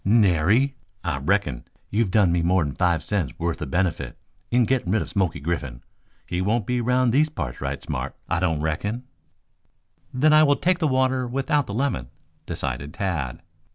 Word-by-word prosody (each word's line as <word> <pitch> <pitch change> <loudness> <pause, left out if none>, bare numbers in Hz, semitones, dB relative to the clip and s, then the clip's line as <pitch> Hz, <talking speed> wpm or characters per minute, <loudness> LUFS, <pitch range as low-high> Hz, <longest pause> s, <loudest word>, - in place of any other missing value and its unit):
"Nary! 105 - +3 0.3
I - - -1
reckon - - 0 0.3
you've 105 0 +1
done 95 -2 +4
me 85 0 +2
more'n 85 -4 +2
five 85 -1 +1
cents' 95 -10 -2
worth 85 0 -2
of - - -4
benefit 80 -6 -1 0.3
in 120 0 +3
getting 125 -7 0
rid 110 - +2
of - - -9
Smoky 90 -4 0
Griffin. 70 -6 -3 0.4
He 90 - -2
won't 105 +3 +1
be 125 +1 0
around 125 +1 +2
these 150 +5 +3
parts 75 - -5
right 70 +1 -2
smart, 65 +2 -4
I - - 0
don't 80 -4 0
reckon." 100 +10 -2 1.1
"Then 150 +4 +3
I 155 - +7
will 145 -2 +5
take 180 +3 +1
the 160 - +2
water 130 -1 +1
without 135 +3 0
the 100 - -4
lemon," 115 - -1 0.4
decided 70 +2 -4
Tad. 85 -11 -3
95 Hz, 175 wpm, -24 LUFS, 80-125 Hz, 1.1 s, I